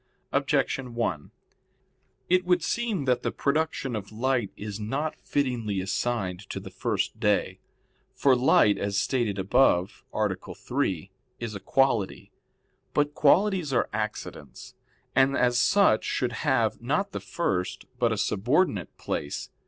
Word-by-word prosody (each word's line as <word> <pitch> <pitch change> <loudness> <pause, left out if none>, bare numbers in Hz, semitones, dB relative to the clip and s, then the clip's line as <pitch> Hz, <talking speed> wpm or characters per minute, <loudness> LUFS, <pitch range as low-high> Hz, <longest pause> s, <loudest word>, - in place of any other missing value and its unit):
Objection 125 -3 0
1: 100 -11 -2 1.0
It 185 +1 +3
would 180 -2 +2
seem 225 - -1
that 125 -2 +2
the - - -1
production 140 -3 -1
of 105 -1 -6
light 120 -1 0
is 105 0 -6
not 135 +9 -2
fittingly 120 -8 -1
assigned 95 -1 -1
to - - -4
the - - -10
first - - -2
day. 105 -4 +1 0.6
For 135 -2 +4
light, 120 -4 +4
as 100 0 -1
stated 110 -1 0
above 95 -1 +2
(A. 110 0 +1 0.3
3), 95 - -2 0.3
is 115 -2 -4
a 100 - -5
quality. 120 -5 0 0.6
But 145 0 +2
qualities 180 +1 +3
are 125 - +1
accidents, 105 - -5 0.4
and 135 +1 +4
as 120 -1 +3
such 185 - +4
should - - -1 0.2
have, - - +1
not - - 0
the - - -4
first, 90 -1 -2
but 120 -2 +3
a 110 - 0
subordinate 105 - 0
place. 70 - -4
120 Hz, 135 wpm, -27 LUFS, 100-140 Hz, 1.0 s, For